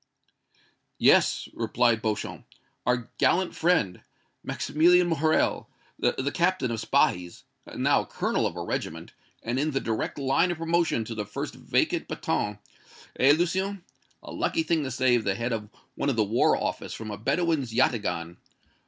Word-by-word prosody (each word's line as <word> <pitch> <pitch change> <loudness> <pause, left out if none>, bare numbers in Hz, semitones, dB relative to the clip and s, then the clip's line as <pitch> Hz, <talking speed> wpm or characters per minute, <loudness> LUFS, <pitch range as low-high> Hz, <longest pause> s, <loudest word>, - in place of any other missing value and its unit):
"Yes," - - +4
replied 120 -2 +1
Beauchamp, 110 -2 -3 0.4
"our 125 -1 0
gallant 185 0 +2
friend, 160 - +1 0.4
Maximilian 175 +4 +3
Morrel, 160 -2 +1 0.3
the 140 +2 0
Captain 175 -8 +1
of 115 - -2
Spahis 90 -3 0 0.3
now - - +2
colonel - - -1
of - - -7
a - - -3
regiment, 80 +1 -4 0.3
and 120 +3 -1
in 150 +2 +1
the 135 -3 -1
direct 110 -3 -3
line 140 +5 +2
of 175 - -2
promotion 165 -7 0
to 115 - -6
the 110 -2 -3
first 105 - -5
vacant - - 0
bâton 105 -1 -2 0.6
eh, 135 +3 +6
Lucien? 190 +2 -1 0.4
A - - -9
lucky 325 - 0
thing 165 - +1
to - - -3
save 125 -2 +2
the 100 -2 0
head 115 +3 -2
of 105 -2 -4 0.2
one 140 - -1
of 135 - 0
the 110 - +3
War 105 +3 +2
Office - - -3
from 110 -1 -7
a - - -4
Bedouin's 155 0 0
yataghan. 105 -8 0
130 Hz, 155 wpm, -26 LUFS, 110-165 Hz, 0.6 s, eh